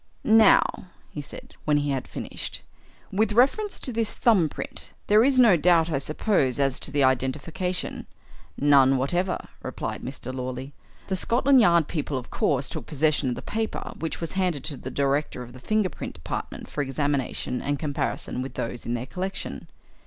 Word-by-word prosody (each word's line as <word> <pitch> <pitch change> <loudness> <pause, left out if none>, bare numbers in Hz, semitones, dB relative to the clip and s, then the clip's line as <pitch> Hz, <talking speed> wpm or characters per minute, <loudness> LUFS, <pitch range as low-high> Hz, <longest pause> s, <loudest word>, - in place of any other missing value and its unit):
"Now," 220 -3 +5 0.3
he 150 - -5
said, 140 - -11
when 150 -1 +3
he 145 -1 0
had 130 -2 -2
finished, - - -5 0.5
"with 215 +2 +1
reference 280 - +3
to 255 - -2
this 225 -1 0
thumb 195 -10 +4
print. - - -7
There 210 +2 +5
is 270 0 +3
no 235 -7 +7
doubt, 165 0 +4
I 135 - +1
suppose, 145 - 0
as 135 -2 +1
to - - -4
the 145 -1 +1
identification?" 150 +8 -1 0.5
"None 135 -2 +5
whatever," 175 +8 0 0.2
replied - - -4
Mr. 130 0 -6
Lawley. 130 +2 -5 0.3
"The 190 - -1
Scotland 255 +6 +4
Yard 170 -6 +4
people, 150 -4 -2
of 125 - -7
course, 140 -2 +1
took - - -6
possession 150 -2 +1
of 125 - -1
the - - -8
paper, 220 0 -3
which 160 - -3
was 165 - -4
handed 180 -7 0
to 145 -4 -4
the 130 - -6
director 140 -1 0
of 120 0 -12
the 130 - -11
finger 215 +6 +1
print - - -7
department 75 - -6
for 150 - -3
examination 135 -2 -1
and 145 0 -1
comparison 145 -3 -2
with 130 - -6
those 120 +1 -4
in 120 - 0
their 120 +1 -3
collection. 185 +8 -4
150 Hz, 175 wpm, -26 LUFS, 135-190 Hz, 0.5 s, no